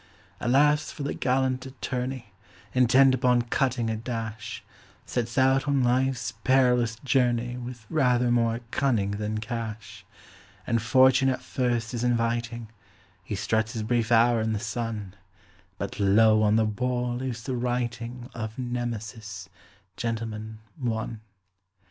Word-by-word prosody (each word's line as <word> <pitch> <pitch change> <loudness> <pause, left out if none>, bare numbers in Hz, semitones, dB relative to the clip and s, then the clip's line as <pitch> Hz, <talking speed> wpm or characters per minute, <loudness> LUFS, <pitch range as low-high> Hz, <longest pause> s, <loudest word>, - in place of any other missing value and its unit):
Alas! 145 +4 +3
for 145 - -7
the 140 - -2
gallant 130 0 0
attorney, 130 -3 -5 0.4
Intent 130 +1 +5
upon 125 -2 +3
cutting 120 0 0
a 110 - -1
dash, 115 0 -5 0.4
Sets 120 +1 -3
out 135 +1 +3
on 140 -2 +2
life's 130 0 +1
perilous 125 -3 +3
journey 125 -3 +1
With 120 -2 -8
rather 125 -4 +2
more 115 -1 +1
cunning 115 -8 +1
than 105 +1 -3
cash. 110 -3 -6 0.6
And 115 -1 +1
fortune 130 +2 +5
at 130 - -2
first 120 -2 -1
is 120 -1 -2
inviting 115 -1 -1 0.5
He 105 - -4
struts 110 +3 0
his 110 -3 -3
brief 115 +1 0
hour 115 0 +5
in 110 0 0
the 105 - -1
sun 110 -3 -4 0.6
But, - - -5
lo! 110 +2 +5
on 105 0 +3
the 110 0 +3
wall 125 +2 -1
is 120 -3 -4
the 130 0 -3
writing 120 0 -3
Of 110 -1 -5
Nemesis, 115 -5 -5 0.5
"Gentleman, 110 -2 -4 0.2
One". 110 -3 -3
120 Hz, 130 wpm, -26 LUFS, 110-125 Hz, 0.6 s, Intent